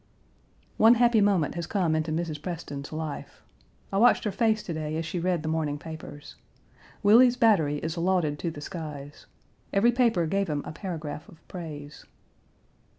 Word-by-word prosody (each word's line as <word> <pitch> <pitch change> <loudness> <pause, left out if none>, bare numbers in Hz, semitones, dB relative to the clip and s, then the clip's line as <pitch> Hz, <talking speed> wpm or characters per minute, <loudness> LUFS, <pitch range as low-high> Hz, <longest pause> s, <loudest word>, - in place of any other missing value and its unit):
One 225 +2 +7
happy 235 -2 +4
moment 195 -7 +2
has 170 -1 -4
come 180 -6 +1
into 155 0 -1
Mrs. 160 -2 -3
Preston's 150 -5 -6
life. 155 -2 -6 0.5
I 195 - +2
watched 245 +3 +5
her 210 - -1
face 220 0 +1
to 170 - -5
day 155 0 -3
as 165 - -3
she 175 - -3
read 175 -2 0
the - - -4
morning 155 -2 -1
papers. 145 -1 -10 0.7
Willie's 240 +4 +6
battery 165 -12 +3
is 160 +3 -4
lauded 170 -5 +1
to 170 - -2
the 150 -2 -8
skies. 150 -4 -8 0.4
Every 220 +5 +4
paper 235 -8 +2
gave 195 +4 0
him 145 -1 -2
a - - -6
paragraph 155 -3 -6
of 165 - -19
praise. 150 -4 -8
165 Hz, 165 wpm, -27 LUFS, 150-200 Hz, 0.7 s, One